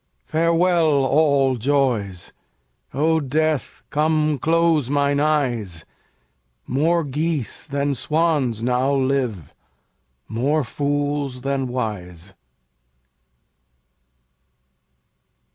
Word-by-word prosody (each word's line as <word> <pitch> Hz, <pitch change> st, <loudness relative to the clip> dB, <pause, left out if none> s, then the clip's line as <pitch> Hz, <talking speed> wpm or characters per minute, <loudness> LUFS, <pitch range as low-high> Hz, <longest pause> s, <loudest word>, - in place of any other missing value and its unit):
Farewell, 165 Hz, -3 st, +2 dB
all 140 Hz, -2 st, +3 dB
joys; 115 Hz, -8 st, -1 dB, 0.6 s
O 160 Hz, +4 st, +2 dB
Death, 155 Hz, 0 st, -1 dB
come 155 Hz, -1 st, +1 dB
close 165 Hz, -3 st, +2 dB
mine 140 Hz, 0 st, +1 dB
eyes; 120 Hz, -, -1 dB, 0.8 s
More 165 Hz, +6 st, +1 dB
geese 150 Hz, -3 st, -3 dB
than 140 Hz, 0 st, -1 dB
swans 140 Hz, -5 st, 0 dB
now 125 Hz, +2 st, +1 dB
live, 130 Hz, -, -1 dB, 0.7 s
more 140 Hz, +7 st, 0 dB
fools 145 Hz, 0 st, -2 dB
than 135 Hz, 0 st, -1 dB
wise. 95 Hz, -7 st, -5 dB
140 Hz, 75 wpm, -21 LUFS, 125-155 Hz, 0.8 s, all